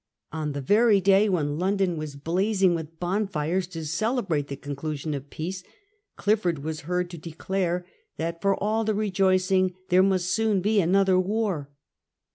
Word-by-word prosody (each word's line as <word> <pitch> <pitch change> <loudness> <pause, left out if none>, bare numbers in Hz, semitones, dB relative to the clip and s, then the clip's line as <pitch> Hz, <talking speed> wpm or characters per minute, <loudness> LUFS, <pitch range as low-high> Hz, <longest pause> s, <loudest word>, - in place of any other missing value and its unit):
On 155 -2 -3
the 140 - -4
very 210 - +4
day 195 +2 +4
when 150 -5 0
London 190 -1 +1
was 155 -2 -6
blazing 185 +5 +1
with 165 -1 -6
bonfires 180 -2 -1
to 165 -3 -7
celebrate 195 - -1
the 140 - -5
conclusion 145 +2 -4
of 140 0 -6
peace, 180 +5 -5 0.5
Clifford 180 -8 0
was 155 0 -4
heard 180 0 0
to 170 - -8
declare 175 +2 -2 0.3
that 165 +1 -3
for 195 0 +2
all 215 +2 0
the 215 -1 0
rejoicing 185 -2 +2
there 180 0 +5
must 185 -2 +2
soon 220 -1 +2
be 210 +2 +2
another 190 +1 +3
war. 190 -7 -1
180 Hz, 155 wpm, -26 LUFS, 160-195 Hz, 0.5 s, there